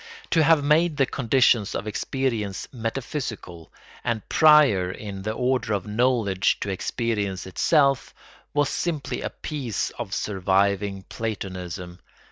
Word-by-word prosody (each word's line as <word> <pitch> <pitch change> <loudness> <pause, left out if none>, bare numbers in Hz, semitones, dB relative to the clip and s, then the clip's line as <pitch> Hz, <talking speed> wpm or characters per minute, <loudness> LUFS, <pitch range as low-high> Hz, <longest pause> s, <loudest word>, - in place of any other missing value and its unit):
To 165 - +4
have 155 -1 +4
made 155 +2 +3
the 135 - +4
conditions 120 -4 +2
of - - -3
experience 110 -3 -2
metaphysical, 115 - -5 0.3
and 115 -3 -2
prior 150 - +5
in 95 0 -7
the 105 +2 -2
order 125 -2 0
of 100 -3 -2
knowledge 105 -4 +1
to 100 - -2
experience 100 -1 -2
itself, 140 - +2 0.4
was 145 -1 +1
simply 160 -5 -2
a - - -3
piece 135 -9 -4
of 115 -5 -7
surviving 100 0 0
Platonism. 90 -5 -5
110 Hz, 120 wpm, -24 LUFS, 95-135 Hz, 0.4 s, prior